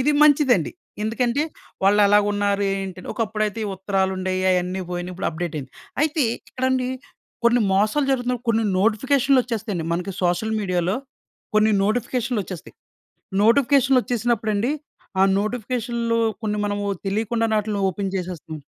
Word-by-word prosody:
ఇది 290 Hz, +4 st, +3 dB
మంచిదండి. 280 Hz, -, +4 dB, 0.3 s
ఎందుకంటే 235 Hz, +5 st, 0 dB, 0.4 s
వాళ్లెలా 205 Hz, +1 st, +5 dB
ఉన్నారు, 205 Hz, 0 st, 0 dB
ఏంటి 195 Hz, -2 st, -5 dB
అని. -, -, -11 dB
ఒకప్పుడైతే 215 Hz, -2 st, -1 dB
ఈ -, -, -2 dB
ఉత్తరాలుండే‌యి. 190 Hz, -1 st, -1 dB
అయన్నీ 180 Hz, +1 st, 0 dB
పోయినాయి. 175 Hz, 0 st, -4 dB
ఇప్పుడు 185 Hz, -, -2 dB
అప్డేట్ 170 Hz, 0 st, -4 dB
అయింది. 135 Hz, -2 st, -8 dB, 0.3 s
అయితే 310 Hz, 0 st, +1 dB, 0.3 s
ఇక్కడండి 260 Hz, 0 st, 0 dB, 0.6 s
కొన్ని 240 Hz, +1 st, +5 dB
మోసాలు 215 Hz, +9 st, +2 dB
జరుగుతున్నాయి, 250 Hz, -2 st, 0 dB
కొన్ని 225 Hz, 0 st, +2 dB
నోటిఫికేషన్లోచ్చేస్తాయి 235 Hz, 0 st, +2 dB
అండి. 165 Hz, -2 st, -3 dB
మనకి 180 Hz, +3 st, -2 dB
సోషల్ 180 Hz, +5 st, +1 dB
మీడియాలో 185 Hz, -1 st, 0 dB, 0.6 s
కొన్ని 215 Hz, 0 st, +4 dB
నోటిఫికేషన్లోచ్చేస్తాయి. 220 Hz, -4 st, -2 dB, 0.7 s
నోటిఫికేషన్లోచ్చేసినప్పుడండి 240 Hz, -3 st, +2 dB, 0.5 s
ఆ -, -, +7 dB, 0.2 s
నోటిఫికేషన్లు 235 Hz, +1 st, -1 dB, 0.2 s
కొన్ని 210 Hz, -2 st, -1 dB
మనము 205 Hz, 0 st, -2 dB, 0.2 s
తెలియకుండానే 220 Hz, +2 st, 0 dB
ఆటిలిని 205 Hz, -1 st, -2 dB
ఓపెన్ 195 Hz, +1 st, -3 dB
చేసేస్తున్నాం. 175 Hz, -4 st, -5 dB
215 Hz, 120 wpm, -23 LUFS, 190-245 Hz, 0.7 s, ఆ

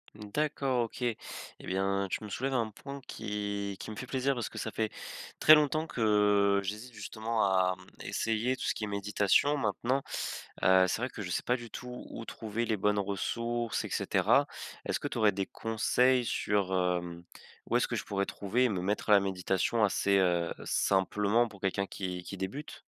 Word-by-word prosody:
D'accord, 130 Hz, +3 st, 0 dB
OK, 115 Hz, -, -7 dB
et 120 Hz, -3 st, 0 dB, 0.4 s
bien, 95 Hz, +1 st, 0 dB
tu 100 Hz, -, -3 dB
me 105 Hz, -, -6 dB
soulèves 135 Hz, +7 st, -2 dB
un 115 Hz, -4 st, +1 dB
point 140 Hz, +6 st, -9 dB
qui 100 Hz, -2 st, -3 dB
qui -, -, -7 dB
me 110 Hz, -, -6 dB
fait 125 Hz, -, -5 dB
plaisir, 135 Hz, +1 st, 0 dB
parce 120 Hz, -, -2 dB
que -, -, -7 dB
ça 110 Hz, -, -2 dB
fait 110 Hz, 0 st, -2 dB, 0.5 s
très 155 Hz, -, +9 dB
longtemps 155 Hz, +2 st, +2 dB
que 105 Hz, -3 st, +3 dB
j'hésite 105 Hz, +5 st, -5 dB
justement 110 Hz, 0 st, -2 dB
à, 95 Hz, -1 st, +3 dB
hem, 95 Hz, -, -16 dB, 0.2 s
essayer 115 Hz, +3 st, 0 dB
tout -, -, -7 dB
ce -, -, +1 dB
qui 110 Hz, -, -5 dB
est -, -, -1 dB
méditation. 105 Hz, +8 st, +2 dB
Maintenant, 125 Hz, +4 st, 0 dB, 0.6 s
heu, 95 Hz, 0 st, +6 dB
c'est -, -, 0 dB
vrai 130 Hz, -, -1 dB
que 105 Hz, -, -8 dB
je 90 Hz, -, -5 dB
sais -, -, 0 dB
pas 125 Hz, +1 st, +1 dB
du 120 Hz, -1 st, -10 dB
tout 125 Hz, 0 st, -7 dB
où 115 Hz, -, -7 dB
trouver 115 Hz, +1 st, -3 dB
les 110 Hz, -2 st, 0 dB
bonnes 105 Hz, +1 st, +2 dB
ressources 115 Hz, +4 st, -1 dB
et -, -, -6 dB
cetera. -, -, +3 dB, 0.4 s
Est-ce -, -, -1 dB
que -, -, -3 dB
tu -, -, -5 dB
aurais 105 Hz, -2 st, +5 dB
des 95 Hz, 0 st, -2 dB
conseils 125 Hz, +3 st, +2 dB
sur, 100 Hz, -4 st, 0 dB
hem, 90 Hz, -1 st, -1 dB, 0.5 s
où -, -, +4 dB
est-ce -, -, +1 dB
que -, -, -2 dB
je -, -, -2 dB
pourrais 100 Hz, -1 st, -1 dB
trouver 110 Hz, +6 st, 0 dB
et 125 Hz, -, +3 dB
me 95 Hz, -4 st, -1 dB
mettre 105 Hz, +3 st, -1 dB
à -, -, +8 dB
la 100 Hz, -, +8 dB
méditation, 95 Hz, +3 st, 0 dB
assez, 100 Hz, -1 st, +3 dB
heu, 85 Hz, -2 st, +2 dB
simplement 105 Hz, +4 st, +2 dB
pour 100 Hz, -3 st, -14 dB
quelqu'un 100 Hz, 0 st, 0 dB
qui 90 Hz, -2 st, -4 dB
qui 95 Hz, -, -7 dB
débute? 95 Hz, +11 st, -5 dB
105 Hz, 200 wpm, -31 LUFS, 100-120 Hz, 0.6 s, très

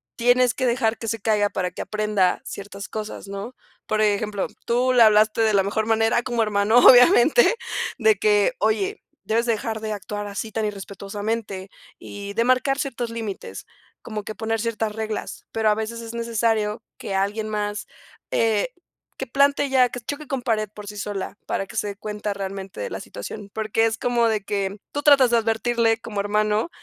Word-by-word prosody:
tienes 245 Hz, 0 st, +3 dB
que 260 Hz, -, -2 dB
dejar 235 Hz, -2 st, +1 dB
que 225 Hz, -, -7 dB
se 225 Hz, +1 st, -1 dB
caiga 210 Hz, -1 st, +2 dB
para 180 Hz, -2 st, -2 dB
que -, -, -6 dB
aprenda 210 Hz, -4 st, 0 dB
ciertas 200 Hz, 0 st, -7 dB
cosas, 215 Hz, -2 st, -6 dB
¿no? 200 Hz, +5 st, -6 dB, 0.3 s
Por 215 Hz, 0 st, +1 dB
ejemplo, 210 Hz, -1 st, 0 dB, 0.2 s
tú 250 Hz, +2 st, +2 dB
le 245 Hz, -, +5 dB
hablaste 215 Hz, +1 st, +4 dB
de 220 Hz, -1 st, +3 dB
la 195 Hz, -1 st, +4 dB
mejor 215 Hz, +2 st, -1 dB
manera 225 Hz, +1 st, +2 dB
como 240 Hz, -2 st, 0 dB
hermano, 210 Hz, +2 st, +3 dB
obviamente, 260 Hz, -, +7 dB, 0.4 s
de 220 Hz, -4 st, +4 dB
que: 205 Hz, 0 st, +3 dB
"Oye, 215 Hz, -2 st, 0 dB, 0.2 s
debes 220 Hz, +4 st, +1 dB
dejar 225 Hz, -1 st, -1 dB
de 220 Hz, -1 st, -3 dB
actuar 205 Hz, 0 st, -5 dB
así 205 Hz, +2 st, -5 dB
tan 220 Hz, 0 st, -1 dB
irrespetuosamente", 200 Hz, 0 st, -4 dB, 0.3 s
y 200 Hz, 0 st, -8 dB
de 230 Hz, +3 st, +2 dB
marcar 255 Hz, +2 st, +2 dB
ciertos 245 Hz, -4 st, -3 dB
límites, 225 Hz, -4 st, -6 dB, 0.4 s
como 215 Hz, -2 st, -5 dB
que 215 Hz, -, -7 dB
poner 225 Hz, 0 st, -2 dB
ciertas 225 Hz, -1 st, -1 dB
reglas, 220 Hz, -1 st, -5 dB
pero 220 Hz, -1 st, +1 dB
a 210 Hz, -, +3 dB
veces 220 Hz, +2 st, -4 dB
es 230 Hz, 0 st, -8 dB
necesario 225 Hz, -2 st, 0 dB
que 195 Hz, -, -4 dB
alguien 205 Hz, +3 st, -1 dB
más, 210 Hz, -1 st, -3 dB, 0.4 s
eh, 225 Hz, 0 st, +2 dB, 0.5 s
que 265 Hz, -, -4 dB
plante 280 Hz, +3 st, +3 dB
ya, 255 Hz, -2 st, +4 dB
que 245 Hz, -, -6 dB
choque 285 Hz, +5 st, -6 dB
con 270 Hz, -1 st, -2 dB
pared 215 Hz, -4 st, 0 dB
por 210 Hz, -1 st, -9 dB
sí 210 Hz, 0 st, -7 dB
sola 200 Hz, 0 st, -4 dB
para 195 Hz, -, -1 dB
que -, -, -12 dB
se -, -, 0 dB
dé 200 Hz, -, -5 dB
cuenta 210 Hz, 0 st, -4 dB
realmente 195 Hz, -1 st, -6 dB
de -, -, -3 dB
la -, -, -4 dB
situación, 205 Hz, -2 st, -8 dB
porque 220 Hz, +1 st, +1 dB
es 225 Hz, 0 st, -2 dB
como 240 Hz, 0 st, +2 dB
de 215 Hz, -2 st, 0 dB
que 200 Hz, 0 st, -2 dB
tú 290 Hz, -, -2 dB
tratas 275 Hz, -4 st, +6 dB
de 235 Hz, -, +5 dB
advertirle 225 Hz, 0 st, +1 dB
como 210 Hz, -3 st, -5 dB
hermano 210 Hz, +5 st, +1 dB
220 Hz, 185 wpm, -23 LUFS, 205-235 Hz, 0.5 s, obviamente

